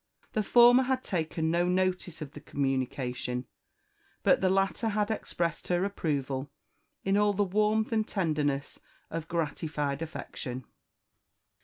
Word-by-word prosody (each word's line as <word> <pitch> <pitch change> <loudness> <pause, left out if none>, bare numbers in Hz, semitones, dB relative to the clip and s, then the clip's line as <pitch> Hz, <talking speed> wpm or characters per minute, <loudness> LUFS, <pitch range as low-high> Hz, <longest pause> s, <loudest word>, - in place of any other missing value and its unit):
The 215 - +2
former 240 +4 +7
had 260 0 0
taken 160 -3 -1
no 175 +1 +2
notice 180 -3 0
of 140 - -10
the 150 - -10
communication, 130 -2 -2 0.8
but - - +4
the 190 - +3
latter 195 +4 +1
had 210 0 0
expressed 170 -6 -2
her 180 +1 +2
approval 140 -8 -2 0.5
in 195 +1 +2
all 205 0 +4
the 205 +1 +2
warmth 215 +3 +1
and 220 -1 +1
tenderness 150 -7 -1 0.3
of 160 -1 -4
gratified 150 -3 -2
affection. 130 -5 -6
170 Hz, 130 wpm, -29 LUFS, 145-205 Hz, 0.8 s, former